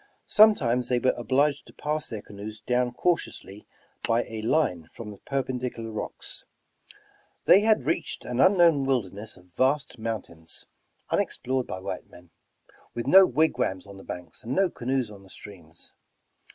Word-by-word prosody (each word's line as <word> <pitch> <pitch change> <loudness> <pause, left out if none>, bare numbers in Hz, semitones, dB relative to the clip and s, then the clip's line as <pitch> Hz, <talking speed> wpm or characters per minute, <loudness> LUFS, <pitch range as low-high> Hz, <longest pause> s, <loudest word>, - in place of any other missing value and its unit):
Sometimes 130 - +5
they 125 - +2
were 130 +1 +2
obliged 140 +4 +1
to - - -15
pass 150 +1 -2
their 110 -3 -6
canoes 105 +1 -8
down 125 +2 0
cautiouslj^ 120 - -2 0.4
by 115 +1 +2
a 110 -1 -6
line 110 - +1
from 110 -2 -8
the 100 - -12
perpendicular 125 -4 -3
rocks. 110 - -5 1.0
They 195 - +8
had 215 - +3
reached 155 +6 -2
an 125 0 -3
unknown 170 -6 +5
wilderness 110 -6 -2
of 90 -1 -21
vast 135 -1 +1
mountains, 95 -8 -4 0.5
unexplored 130 0 0
by 95 - -5
white 95 -1 -5
men, 90 -1 -16 0.6
with 120 - -3
no 190 +6 +8
wigwams 125 -10 +1
on 100 -1 -11
the 95 - -11
banks 90 -3 -7
and 120 +4 -3
no 190 -3 +3
ca 120 - -10
noes 130 -3 0
on 100 -2 -12
the 95 - -17
streams. 85 -6 -9
120 Hz, 155 wpm, -27 LUFS, 100-140 Hz, 1.0 s, They